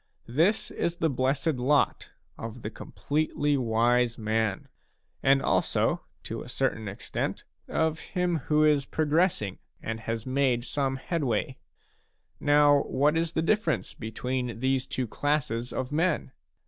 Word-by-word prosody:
This 165 - +1
is 170 - -1
the 165 -3 +1
blessed 135 +5 +1
lot 140 +4 +2 0.3
of 115 +1 -8
the 105 - -4
completely 145 +3 -1
wise 120 -1 +2
man, 110 -2 -1 0.5
and 135 0 +4
also, - - +1 0.2
to - - -5
a - - -9
certain 110 -1 -1
extent, 100 - -4 0.2
of 160 -1 0
him 180 -2 -1
who 150 0 +4
is 150 -2 +4
progress 160 - +2
ing 100 -2 -5 0.2
and 115 0 -4
has 115 0 -4
made 130 -2 +1
some 135 0 -1
headway. 135 -3 -2 0.8
Now 145 -1 +5
what 145 +4 +2
is 165 0 0
the 160 - 0
difference 165 - +1
between 125 +2 -3
these 130 +1 +1
two 130 -2 -2
classes 125 -2 -1
of 130 +1 -3
men 160 -3 0
135 Hz, 135 wpm, -28 LUFS, 120-155 Hz, 0.8 s, Now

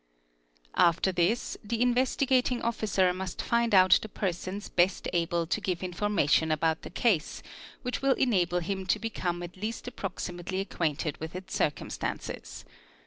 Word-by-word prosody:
After 170 +3 +4
this 180 +6 0
the 225 +2 -2
Investigating 250 0 +2
Officer 205 -5 +1
must 185 -1 -5
find 235 -2 +2
out 185 -1 +7
the 215 - -7
persons 190 +1 -3
best. 180 +2 +1
able 170 0 +1
to 165 - -1
give 180 -1 -2
information 175 -4 +1
about 160 +1 +1
the - - -8
case, 205 -11 0 0.4
which 250 0 -3
will 275 0 +4
enable 180 -8 +2
him 190 +2 -3
to - - +3
become 175 -6 -3
at 175 +1 -9
least 220 +5 -4
approximately 185 -4 -4
acquainted 155 -6 -2
with 160 +2 -7
its 185 +1 -7
circumstances. - - -3
185 Hz, 140 wpm, -29 LUFS, 175-225 Hz, 0.4 s, out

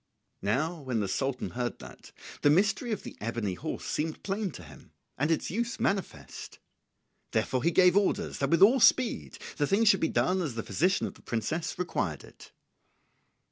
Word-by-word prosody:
Now 155 - 0
when 130 -4 -2
the 100 - -1
Sultan 135 +6 -2
heard 120 -1 -3
that, - - -13 0.3
the 145 - +5
mystery 210 - +2
of 215 - -3
the - - -9
ebony 110 -3 -2
horse - - -5
seemed 155 +1 -3
plain 200 +1 -2
to - - -10
him, - - -15 0.2
and 150 +4 0
its 165 - 0
use 235 +4 -2
manifest. 125 - -3 0.8
Therefore 130 -1 0
he 165 - +3
gave 180 +1 +5
orders 205 +1 +1
that 140 - 0
with 170 +4 +5
all 245 +7 +6
speed 255 0 +3 0.2
the 145 - +1
thing 200 +7 +3
should 195 -3 +5
be 160 - +1
done 185 +1 +1
as 145 -9 -3
the 115 - -3
physician 185 +4 +1
of - - -5
the - - -19
princess 120 +9 -3
required 180 0 -2
it. - - -15
165 Hz, 180 wpm, -29 LUFS, 125-195 Hz, 0.8 s, all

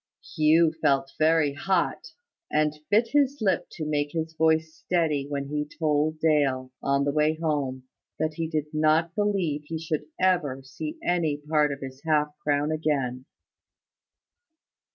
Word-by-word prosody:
Hugh 155 +1 +4
felt 135 -2 +2
very 155 -2 +3
hot, 185 +4 -1 0.4
and 150 0 +2 0.2
bit 220 +3 +3
his 285 0 +2
lip 190 -5 +1
to 155 - -5
make 145 -1 -1
his 160 -1 -3
voice 160 0 +2
steady 160 -6 0
when 140 -1 -3
he 150 0 -2
told 155 0 +1
Dale, 140 -5 +1
on 140 0 +1
the 145 - +1
way 155 +1 +2
home, 140 -5 -1 0.3
that 155 0 -1
he 165 +1 -3
did 155 -2 -1
not 155 +2 +2
believe 190 -8 0
he 160 +2 -4
should 155 -2 -3
ever 160 -8 +1
see 305 - -6
any 165 -5 +1
part 150 0 +1
of 140 - -6
his 135 0 -8
half 150 -2 +2
crown 145 +1 +1
again. 135 -5 -1
155 Hz, 150 wpm, -26 LUFS, 145-165 Hz, 0.4 s, Hugh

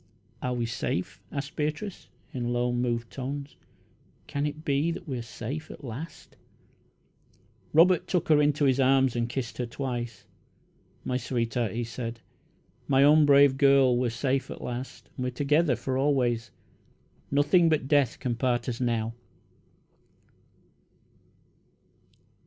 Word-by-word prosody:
"Are 125 -1 -1
we 120 -1 -1
safe?" 95 -6 -3
asked 140 0 -5
Beatrice, 155 +6 -3 0.2
in 120 -2 -2
low, 120 0 +1
moved 120 -1 -1
tones. 140 +2 -5 0.7
"Can 145 +1 -2
it 155 +2 -7
be 145 +3 +1
that 170 +1 -5
we 130 -4 -3
are - - -4
safe 130 +7 -6
at - - -11
last?" 130 +6 -8 1.4
Robert 170 +2 +5
took 175 -2 0
her 150 -1 +6
into 145 0 +2
his 135 0 +3
arms 130 -1 +4
and 120 0 -1
kissed 120 -1 -4
her 125 - -1
twice. 120 -3 -5 0.8
"My 125 - 0
sweetheart," 120 -3 -1
he 120 +1 -2
said, 115 0 -5 0.7
"my 135 0 +4
own 150 +1 +6
brave 140 -1 +6
girl, 135 -3 +5
we 125 0 +1
are - - 0
safe 130 +3 -1
at - - -8
last, 125 +2 -6
and 125 - -4
we - - -1
are - - -2
together 145 +1 +2
for 130 +3 -2
always. 125 -5 +1 0.8
Nothing 150 +5 +4
but 150 -4 +1
death 140 -4 +3
can 125 - -2
part 120 -1 0
us 125 0 -3
now!" 115 -2 0
130 Hz, 145 wpm, -27 LUFS, 120-145 Hz, 1.4 s, her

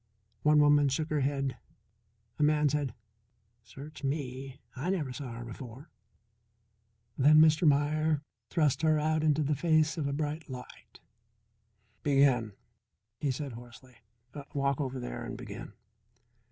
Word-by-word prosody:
One 150 +5 +4
woman 145 -1 +5
shook 155 +4 -2
her 150 - +1
head. 135 -2 -1 0.8
A - - -1
man 150 0 +3
said: 140 -4 -2 0.7
"Search 140 +8 -11
me! 135 -1 -4 0.2
I 140 +7 -3
never 155 -9 -1
saw 125 -2 -6
her 120 +1 -7
before." 125 +5 -10 1.3
Then 150 +3 +6
Mr. 155 +1 +5
Meier 150 +1 +2 0.3
thrust 150 -5 +1
her 155 -1 +3
out 155 +1 +1
in 155 -1 +4
the 150 0 0
face 155 +1 +2
of 145 - -1
a - - -1
bright 150 +2 -3
light. 125 -1 -10 1.0
"Begin," 135 -6 +3 0.7
he 145 - -1
said 135 +1 -3
hoarsely. 120 +1 -13 0.6
"Walk 140 0 0
over 130 -1 -3
there - - -5
and - - -6
begin." - - -8
145 Hz, 135 wpm, -30 LUFS, 130-155 Hz, 1.3 s, Then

